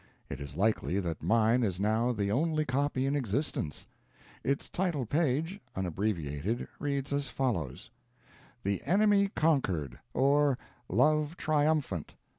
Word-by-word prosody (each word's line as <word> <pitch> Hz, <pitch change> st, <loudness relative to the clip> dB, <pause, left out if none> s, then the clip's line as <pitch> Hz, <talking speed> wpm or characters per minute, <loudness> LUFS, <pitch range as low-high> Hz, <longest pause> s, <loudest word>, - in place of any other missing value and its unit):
It 70 Hz, -, -4 dB
is 70 Hz, +1 st, -7 dB
likely 100 Hz, -2 st, +1 dB
that 85 Hz, -5 st, -3 dB
mine 115 Hz, +2 st, +3 dB
is 95 Hz, -6 st, 0 dB
now 110 Hz, +4 st, +2 dB
the 100 Hz, -4 st, -1 dB
only 155 Hz, +5 st, +1 dB
copy 135 Hz, 0 st, 0 dB
in 140 Hz, +1 st, +1 dB
existence. 125 Hz, -, -2 dB, 0.6 s
Its 140 Hz, +1 st, 0 dB
title 170 Hz, -8 st, -1 dB
page, 160 Hz, -, 0 dB, 0.2 s
unabbreviated, 90 Hz, 0 st, -2 dB
reads 140 Hz, -1 st, -2 dB
as 140 Hz, -2 st, -1 dB
follows: 95 Hz, -, -2 dB, 0.7 s
"The 100 Hz, 0 st, 0 dB
Enemy 200 Hz, +1 st, +4 dB
Conquered; 95 Hz, -, +1 dB
or, 140 Hz, 0 st, +3 dB, 0.3 s
Love 155 Hz, +2 st, +2 dB
Triumphant. 150 Hz, -, 0 dB
130 Hz, 120 wpm, -31 LUFS, 100-150 Hz, 0.7 s, Enemy